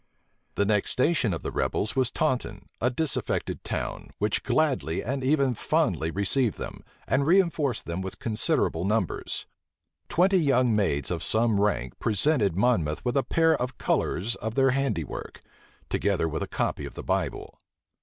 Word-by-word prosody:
The 100 Hz, -, +2 dB
next 105 Hz, -1 st, +1 dB
station 130 Hz, -, +2 dB
of 85 Hz, -, -4 dB
the -, -, -3 dB
rebels 105 Hz, -, -1 dB
was 130 Hz, -3 st, +2 dB
Taunton, 130 Hz, -4 st, -1 dB, 0.2 s
a 120 Hz, -, +3 dB
disaffected 150 Hz, +4 st, -2 dB
town, -, -, -4 dB
which 105 Hz, 0 st, 0 dB
gladly 135 Hz, -, 0 dB
and 135 Hz, +4 st, -2 dB
even 135 Hz, -1 st, +2 dB
fondly 80 Hz, -6 st, 0 dB
received 100 Hz, -, 0 dB
them, -, -, -7 dB, 0.2 s
and 130 Hz, -, +2 dB
reënforced 160 Hz, -4 st, +2 dB
them 85 Hz, +2 st, -4 dB
with 95 Hz, 0 st, -6 dB
considerable 105 Hz, -6 st, +1 dB
numbers. 105 Hz, -2 st, -1 dB, 0.6 s
Twenty 185 Hz, +2 st, +4 dB
young 130 Hz, -7 st, +3 dB
maids 70 Hz, -10 st, 0 dB
of -, -, -2 dB
some 110 Hz, -2 st, +2 dB
rank 65 Hz, -12 st, -1 dB
presented 110 Hz, -, +2 dB
Monmouth 90 Hz, -7 st, +1 dB
with 125 Hz, -, 0 dB
a 140 Hz, -, +4 dB
pair 160 Hz, +3 st, +3 dB
of 125 Hz, -2 st, -4 dB
colors 105 Hz, +7 st, 0 dB
of 110 Hz, +1 st, -4 dB
their 135 Hz, -1 st, +4 dB
handiwork, 125 Hz, -, -2 dB, 0.5 s
together 95 Hz, -5 st, 0 dB
with 80 Hz, -1 st, -3 dB
a -, -, -2 dB
copy -, -, -2 dB
of -, -, -12 dB
the -, -, -6 dB
Bible. -, -, -2 dB
120 Hz, 155 wpm, -27 LUFS, 100-140 Hz, 0.6 s, Twenty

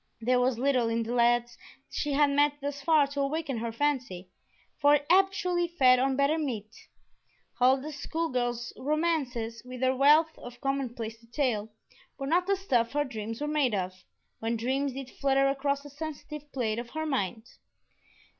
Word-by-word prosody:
There 250 Hz, +2 st, +2 dB
was 250 Hz, -1 st, +1 dB
little 255 Hz, -2 st, +2 dB
in 230 Hz, 0 st, 0 dB
the 230 Hz, +2 st, -4 dB
lads 240 Hz, 0 st, +2 dB, 0.3 s
she 295 Hz, -1 st, -2 dB
had 290 Hz, 0 st, +4 dB
met 290 Hz, +1 st, +3 dB
thus 285 Hz, 0 st, -4 dB
far 310 Hz, -1 st, +4 dB
to 280 Hz, 0 st, -3 dB
awaken 280 Hz, -3 st, -2 dB
her 230 Hz, 0 st, -3 dB
fancy, 235 Hz, -9 st, -2 dB, 0.5 s
for 290 Hz, +1 st, +6 dB
it 290 Hz, 0 st, -1 dB
habitually 365 Hz, -2 st, +3 dB
fed 260 Hz, -7 st, +4 dB
on 265 Hz, +1 st, +1 dB
better 280 Hz, +4 st, +2 dB
meat. 230 Hz, -7 st, -4 dB, 0.8 s
Huldah's 265 Hz, +4 st, +2 dB
school 325 Hz, +3 st, -2 dB
girl 245 Hz, -1 st, 0 dB, 0.2 s
romances, 270 Hz, -7 st, -1 dB
with 250 Hz, 0 st, -9 dB
their 260 Hz, 0 st, +2 dB
wealth 300 Hz, +4 st, +5 dB
of 245 Hz, 0 st, -10 dB
commonplace 240 Hz, -5 st, -3 dB
detail, 230 Hz, -3 st, -2 dB, 0.5 s
were 275 Hz, -, -4 dB
not 350 Hz, +6 st, +2 dB
the 395 Hz, -, +3 dB
stuff 255 Hz, -12 st, 0 dB
her 290 Hz, 0 st, +2 dB
dreams 225 Hz, -2 st, -6 dB
were 295 Hz, -, -1 dB
made 290 Hz, -7 st, +1 dB
of, 185 Hz, -1 st, -2 dB, 0.5 s
when 230 Hz, +1 st, -1 dB
dreams 265 Hz, +4 st, -1 dB
did 265 Hz, -1 st, -7 dB
flutter 275 Hz, 0 st, +2 dB
across 280 Hz, +1 st, 0 dB
the 290 Hz, -, -10 dB
sensitive 300 Hz, -1 st, -7 dB
plate 230 Hz, -4 st, -1 dB
of 240 Hz, 0 st, -7 dB
her 315 Hz, +3 st, -4 dB
mind. 225 Hz, -, -2 dB
270 Hz, 170 wpm, -29 LUFS, 240-295 Hz, 0.8 s, for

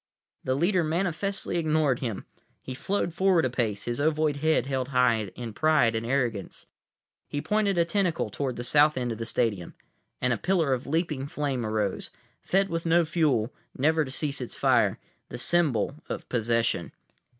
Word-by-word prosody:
The 130 Hz, -, 0 dB
leader 175 Hz, +4 st, +2 dB
manifestly 175 Hz, +3 st, -1 dB
ignored 155 Hz, -5 st, +1 dB
him. 115 Hz, -7 st, -4 dB, 0.4 s
He 130 Hz, -, -6 dB
flowed 175 Hz, +5 st, -2 dB
forward 185 Hz, -3 st, +3 dB
a 130 Hz, -, -1 dB
pace, 110 Hz, -5 st, -1 dB
his 120 Hz, +1 st, -3 dB
ovoid 155 Hz, 0 st, +1 dB
head 155 Hz, -3 st, +2 dB
held 130 Hz, -2 st, -2 dB
high 125 Hz, -5 st, +2 dB
in 120 Hz, -3 st, -6 dB
pride 150 Hz, -4 st, +3 dB
and 110 Hz, 0 st, -2 dB
arrogance. 120 Hz, -7 st, -2 dB, 0.6 s
He 145 Hz, -, -3 dB
pointed 205 Hz, +2 st, +1 dB
a 170 Hz, -, +4 dB
tentacle 170 Hz, -, 0 dB
toward 130 Hz, +2 st, -3 dB
the 120 Hz, -, -5 dB
south 150 Hz, +4 st, +4 dB
end 125 Hz, -2 st, -1 dB
of 115 Hz, -, -5 dB
the 115 Hz, -, -3 dB
stadium, 105 Hz, -8 st, -1 dB, 0.4 s
and 125 Hz, 0 st, +1 dB
a -, -, -1 dB
pillar 170 Hz, -7 st, +1 dB
of 125 Hz, 0 st, -3 dB
leaping 150 Hz, -3 st, -1 dB
flame 140 Hz, -4 st, -2 dB
arose; 110 Hz, -3 st, -2 dB, 0.3 s
fed 195 Hz, +1 st, +1 dB
with 165 Hz, -1 st, -3 dB
no 170 Hz, +1 st, +4 dB
fuel, 150 Hz, -8 st, +1 dB, 0.2 s
never 155 Hz, +4 st, +3 dB
to 135 Hz, -, -7 dB
cease 140 Hz, 0 st, -1 dB
its 125 Hz, -, -6 dB
fire, -, -, +3 dB, 0.3 s
the -, -, -6 dB
symbol 145 Hz, 0 st, +1 dB
of -, -, -5 dB
possession. 115 Hz, -1 st, 0 dB
140 Hz, 170 wpm, -27 LUFS, 120-165 Hz, 0.6 s, a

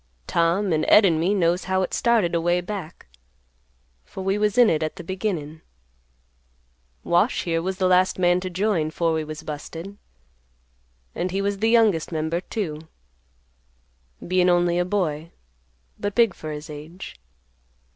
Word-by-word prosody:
Tom 170 Hz, +3 st, +1 dB
and 155 Hz, -, +1 dB
Ed 210 Hz, -, +7 dB
and 165 Hz, -4 st, +2 dB
me 185 Hz, +5 st, +1 dB
knows 175 Hz, -1 st, +1 dB
how 190 Hz, 0 st, +1 dB
it -, -, -4 dB
started 225 Hz, -8 st, +2 dB
away 175 Hz, +1 st, +1 dB
back, 180 Hz, -3 st, -7 dB, 1.0 s
for 190 Hz, -, -8 dB
we 195 Hz, +1 st, +1 dB
was 210 Hz, 0 st, 0 dB
in 245 Hz, -2 st, +7 dB
it 155 Hz, -5 st, +1 dB
at 155 Hz, 0 st, -3 dB
the 185 Hz, -, -9 dB
beginnin'. 170 Hz, -5 st, -4 dB, 1.4 s
Wash, 175 Hz, +1 st, +1 dB
here, 165 Hz, -1 st, -1 dB
was 185 Hz, +2 st, -3 dB
the 190 Hz, -, 0 dB
last 185 Hz, 0 st, +3 dB
man 175 Hz, -1 st, +3 dB
to 185 Hz, 0 st, -5 dB
join, 180 Hz, -4 st, 0 dB
'fore 165 Hz, +1 st, 0 dB
we 160 Hz, -1 st, -1 dB
was 155 Hz, +1 st, -8 dB
busted, 165 Hz, +6 st, -7 dB, 1.2 s
and 180 Hz, -, -2 dB
he 190 Hz, +2 st, -2 dB
was 200 Hz, 0 st, -1 dB
the 225 Hz, +2 st, +2 dB
youngest 220 Hz, -9 st, +3 dB
member, 160 Hz, +2 st, -2 dB
too; 160 Hz, -7 st, -5 dB, 1.4 s
bein' 180 Hz, 0 st, +3 dB
only 175 Hz, 0 st, +2 dB
a 180 Hz, -, +1 dB
boy, 170 Hz, -5 st, -2 dB, 0.7 s
but 205 Hz, 0 st, -3 dB
big 230 Hz, -5 st, +4 dB
for 155 Hz, -2 st, -7 dB
his 150 Hz, 0 st, -7 dB
age. 155 Hz, +5 st, -9 dB
175 Hz, 155 wpm, -23 LUFS, 160-195 Hz, 1.4 s, Ed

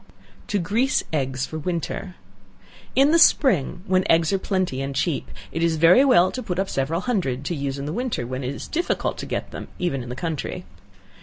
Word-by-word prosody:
To 205 Hz, -, 0 dB
Grease 220 Hz, +9 st, +1 dB
Eggs 135 Hz, -3 st, -1 dB
for 155 Hz, -, -6 dB
Winter. 175 Hz, +2 st, -4 dB, 0.8 s
In 275 Hz, +3 st, +5 dB
the 335 Hz, -, +5 dB
spring 190 Hz, -, +3 dB
when 185 Hz, -2 st, +2 dB
eggs 165 Hz, +2 st, +4 dB
are 195 Hz, -, +2 dB
plenty 185 Hz, -10 st, -1 dB
and 135 Hz, 0 st, -4 dB
cheap, 160 Hz, +1 st, -1 dB, 0.2 s
it 165 Hz, -, -3 dB
is 165 Hz, -1 st, +2 dB
very 170 Hz, -, +6 dB
well 235 Hz, -10 st, +5 dB
to 255 Hz, -, -4 dB
put 180 Hz, -7 st, -4 dB
up 195 Hz, 0 st, -1 dB
several 155 Hz, +6 st, -1 dB
hundred, 145 Hz, -, -1 dB
to 175 Hz, -, -2 dB
use 140 Hz, -1 st, -3 dB
in 140 Hz, -, -5 dB
the 150 Hz, -, -3 dB
winter, 240 Hz, -, -2 dB
when 130 Hz, +2 st, -4 dB
it 130 Hz, +3 st, -3 dB
is -, -, -7 dB
very -, -, -15 dB
difficult -, -, -2 dB
to -, -, -5 dB
get -, -, -4 dB
them, -, -, -7 dB
even 170 Hz, -7 st, -1 dB
in 120 Hz, -, -8 dB
the 125 Hz, -, -5 dB
country. 160 Hz, +1 st, -4 dB
170 Hz, 215 wpm, -23 LUFS, 140-195 Hz, 0.8 s, very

